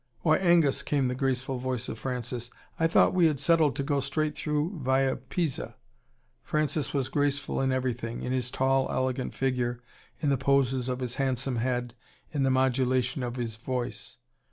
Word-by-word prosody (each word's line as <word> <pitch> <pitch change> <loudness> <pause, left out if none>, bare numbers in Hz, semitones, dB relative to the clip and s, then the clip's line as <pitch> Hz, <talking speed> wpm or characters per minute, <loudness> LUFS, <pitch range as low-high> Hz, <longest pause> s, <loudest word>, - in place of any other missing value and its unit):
"Why, 155 -2 +4
Angus," 170 -6 +4
came 140 -3 +1
the - - -1
graceful 130 0 -1
voice 130 -1 -2
of 110 - -6
Francis, 125 -2 -4 0.3
"I 165 - +4
thought 165 - +4
we 180 -3 +5
had 150 -4 0
settled 160 -3 +3
to 140 - -1
go 140 0 +1
straight 155 +2 -1
through 155 +4 -1
via 130 0 +2
Pisa." 145 +2 -3 0.7
Francis 150 -1 -1
was 135 -3 0
graceful 145 -1 0
in 135 0 +1
everything 120 -3 -2
in 125 - -2
his 125 -1 0
tall, 135 +1 +1
elegant 130 0 -1
figure, 125 -2 0 0.4
in 150 - 0
the 140 - +3
poses 130 -1 +2
of 125 0 -2
his 125 0 -3
handsome 130 -1 -1
head, 120 0 -1 0.4
in 145 - -1
the 135 - +3
modulation 130 0 +1
of 120 -1 -3
his 115 -3 -4
voice. 125 +1 -4
130 Hz, 175 wpm, -28 LUFS, 125-145 Hz, 0.7 s, we